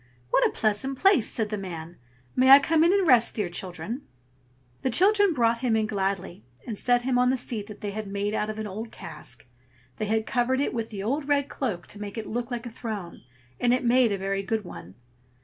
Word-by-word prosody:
"What - - +4
a - - -5
pleasant 225 +5 -1
place!" 385 - +4
said 220 -2 -1
the 210 -1 -3
man. 170 -3 -7 0.4
"May 260 +1 +4
I 270 - +12
come 315 +3 +2
in 340 - +5
and 395 -1 +3
rest, 245 -4 +5
dear 205 -5 -1
children?" 180 - -5 0.8
The 260 - 0
children 400 - +4
brought 235 -5 +2
him 240 -3 +1
in 220 -1 +2
gladly, 195 - -3 0.2
and 225 - -4
set 245 +3 +2
him 250 -1 +1
on 250 0 +4
the 260 - +2
seat 225 -4 -5
that 210 -2 -11
they 205 - -3
had 215 0 -5
made 200 +1 -2
out 210 0 -1
of 215 - -5
an 220 - -4
old 215 +3 -6
cask. 125 -7 -8 0.5
They 215 - -2
had 220 +1 0
covered 255 +1 +1
it 285 - 0
with 230 -2 -3
the 200 -3 -6
old 275 +6 -1
red 285 -1 +2
cloak 205 -11 -3
to 205 - -10
make 205 +1 -6
it 220 - -4
look 240 +1 -3
like 240 -1 -4
a 240 - -6
throne, 215 -7 -6 0.4
and 245 0 +3
it 250 - -3
made 240 -1 +4
a 200 - 0
very 195 +1 -2
good 215 +1 -2
one. 85 - -10
225 Hz, 230 wpm, -26 LUFS, 200-255 Hz, 0.8 s, I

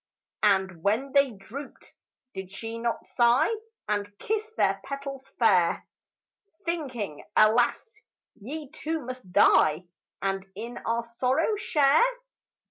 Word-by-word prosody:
And 190 -4 +2
when 225 +9 +1
they 280 0 +4
drooped, 240 +6 -10 0.4
did 190 -1 -7
she 225 +4 -5
not 235 0 -2
sigh 240 - +3 0.3
And 205 -1 -2
kiss 440 0 -2
their 195 0 +2
petals 275 -1 -6
fair, 185 -7 +3 0.8
Thinking, 260 - -3
"Alas, 240 - +3 0.3
ye 285 +8 -7
too 320 -2 -4
must 255 -7 -8
die 155 -1 +5 0.4
And 195 0 -2
in 235 +4 -6
our 230 +1 +1
sorrow 255 - 0
share"? 300 -7 +3
235 Hz, 115 wpm, -27 LUFS, 200-275 Hz, 0.8 s, die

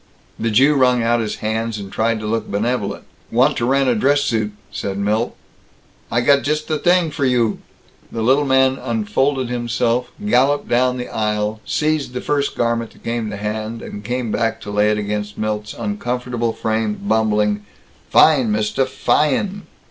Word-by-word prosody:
The 115 - 0
Jew 135 +7 +5
wrung 125 -3 +3
out 120 +1 +2
his 110 -2 -2
hands 110 0 -1
and 100 -2 -8
tried 115 0 +1
to - - -5
look 110 0 -2
benevolent. 105 0 -1 0.3
"Want 130 +5 +3
to 120 - 0
rent 135 +1 +2
a 125 - +4
dress 140 +6 +2
suit," 110 -6 0 0.2
said 100 -1 -4
Milt. 105 +3 0 0.8
"I 120 - +2
got 140 +3 +4
just 150 +1 -1
the 155 -2 -1
t'ing 175 0 +3
for 150 -1 -3
you!" 125 -4 +2 0.5
The 115 - -3
little 135 +5 +3
man 130 0 +3
unfolded 145 - 0
himself, 120 0 0 0.2
galloped 145 -5 +2
down 125 +1 +2
the 125 - -4
aisle, 105 0 -2
seized 150 -4 0
the 125 - -3
first 140 -1 -1
garment 115 -1 0
that - - -21
came 115 -2 -2
to 100 - -5
hand, 110 +2 -4
and 105 - -8
came 120 +1 -2
back 115 0 0
to 105 - -7
lay 105 +1 +3
it 105 - +1
against 105 0 -3
Milt's 105 0 -3
uncomfortable 125 - -2
frame, 110 -1 -1
bumbling, 105 -1 +1 0.5
"Fine, 135 -8 +5
mister, 110 +5 0
fy 150 +2 +2
en!" 200 +6 -3
120 Hz, 175 wpm, -19 LUFS, 110-135 Hz, 0.8 s, Jew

